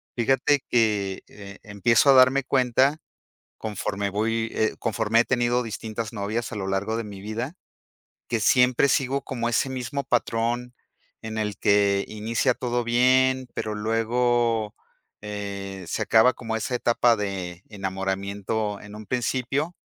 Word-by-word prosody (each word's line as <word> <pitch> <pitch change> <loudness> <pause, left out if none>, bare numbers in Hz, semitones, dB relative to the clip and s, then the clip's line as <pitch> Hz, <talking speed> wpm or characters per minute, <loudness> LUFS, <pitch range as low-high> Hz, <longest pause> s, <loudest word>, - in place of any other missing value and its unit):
Fíjate 135 +4 +2
que, 105 -5 +1
eh, 100 -1 -11
empiezo 115 +7 +3
a - - +7
darme 130 +1 +5
cuenta 130 +3 +2 0.6
conforme 100 -1 -3
voy, 115 +3 -1
eh, 110 - +1
conforme 115 0 +1
he - - +3
tenido 120 -1 +1
distintas 110 0 -5
novias 105 +3 -3
a - - -4
lo 95 -2 -3
largo 95 +3 -1
de 115 - -3
mi 100 -2 -9
vida. 115 - -4 0.7
Que 115 -2 -1
siempre 125 +3 +4
sigo 135 0 +1
como 120 -3 -3
ese 120 +3 +1
mismo 130 +2 -3
patrón 120 -1 -1 0.5
en 110 0 -5
el 105 -2 -2
que 100 -1 +3
inicia 115 +4 0
todo 120 -1 -1
bien, 130 +2 +3
pero 105 -1 -3
luego, 115 0 +1 0.5
eh, 100 -2 -6
se - - -2
acaba 115 +3 +5
como 115 -2 -4
esa 110 +3 -3
etapa 120 0 +3
de 95 -4 -4
enamoramiento 100 +1 -3
en 105 0 -11
un 105 0 -10
principio. 130 - -1
115 Hz, 140 wpm, -25 LUFS, 105-125 Hz, 0.7 s, a